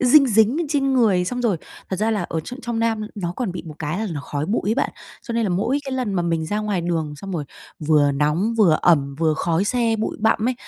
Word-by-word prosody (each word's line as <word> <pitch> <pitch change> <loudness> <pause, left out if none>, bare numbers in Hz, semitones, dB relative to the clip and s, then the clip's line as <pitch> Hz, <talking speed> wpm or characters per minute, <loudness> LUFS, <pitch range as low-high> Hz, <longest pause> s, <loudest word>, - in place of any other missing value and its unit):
dinh 270 +2 +6
dính 220 +4 +4
lên 340 - -1
trên 275 -2 +1
người. 210 -8 +3
Xong 245 +6 -3
rồi 210 -7 +2 0.3
thật 190 - -1
ra 215 +3 +1
là 210 -4 0
ở 165 -2 -3
tr 245 - -8
trong 235 -1 -2
Nam 225 -1 +1
nó 175 -4 -3
còn 225 -8 -2
bị 180 - -6
một 155 - -8
cái 160 +4 -3
là 220 - -1
nó 145 - -4
khói 145 +2 -4
bụi 215 - 0
ấy - - +2
bạn, 275 - 0 0.3
cho 235 - -6
nên 230 - +1
là 205 - 0
mỗi 205 +10 +1
cái 270 - -4
lần 250 -7 -1
mà 175 - +1
mình 165 -2 -1
ra 210 +4 -1
ngoài 210 -4 -1
đường 165 -3 -2
xong 195 +6 -8
rồi 155 -4 -2 0.3
vừa 150 -2 +3
nóng, 150 +11 +1
vừa 170 -7 +5
ẩm, 140 -5 +3
vừa 160 -2 +2
khói 170 +3 0
xe, 230 -1 +1
bụi 220 - -2
bặm 220 +1 +2
ấy, 255 - 0
200 Hz, 270 wpm, -22 LUFS, 165-230 Hz, 0.3 s, dinh